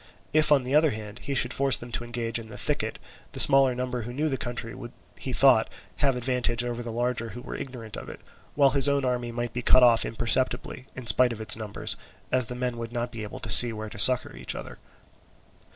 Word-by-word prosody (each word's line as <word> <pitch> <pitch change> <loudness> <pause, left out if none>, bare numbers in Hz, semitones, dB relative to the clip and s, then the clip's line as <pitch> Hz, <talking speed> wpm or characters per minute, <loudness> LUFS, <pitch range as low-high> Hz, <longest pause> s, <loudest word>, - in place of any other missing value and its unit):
If, 155 0 +4
on 140 -3 +4
the 130 +2 -5
other 155 +1 +4
hand, 105 -2 -8
he 140 - -5
should 125 -1 +3
force 140 -1 +2
them 120 0 -10
to 120 - -3
engage 120 -1 -3
in 115 - -10
the 110 - -11
thicket, - - -3 0.4
the - - -5
smaller 135 -2 +5
number 125 -1 -4
who 120 +2 -8
knew 150 +4 -2
the 135 - -2
country 120 -2 -6
would, 120 +1 -10 0.2
he 130 - -7
thought, 125 -3 +3 0.3
have 135 -3 +1
the - - -4
advantage 125 -1 +1
over 120 0 -5
the 120 -1 -6
larger 120 0 -2
who 120 +3 -10
were - - -8
ignorant 120 -5 -8
of - - -9
it, - - -10 0.4
while 140 -2 +4
his 140 0 +4
own 140 -1 0
army 125 -1 -2
might 120 0 -5
be 125 - -4
cut 130 +1 +5
off 120 -2 +4
imperceptibly, 130 +3 -2
in 130 - -8
spite 120 +3 +4
of 115 - -7
its 110 - +4
numbers, 110 -2 -2 0.3
as 130 -2 +1
the 125 - -6
men 125 -1 -4
would 115 0 -7
not 120 0 -4
be 115 - -8
able 105 -1 -8
to 105 - -4
see 115 +6 +9
where 110 -1 -7
to 100 - -8
succour 125 +4 +5
each - - -3
other. - - -9
120 Hz, 240 wpm, -25 LUFS, 115-130 Hz, 0.4 s, see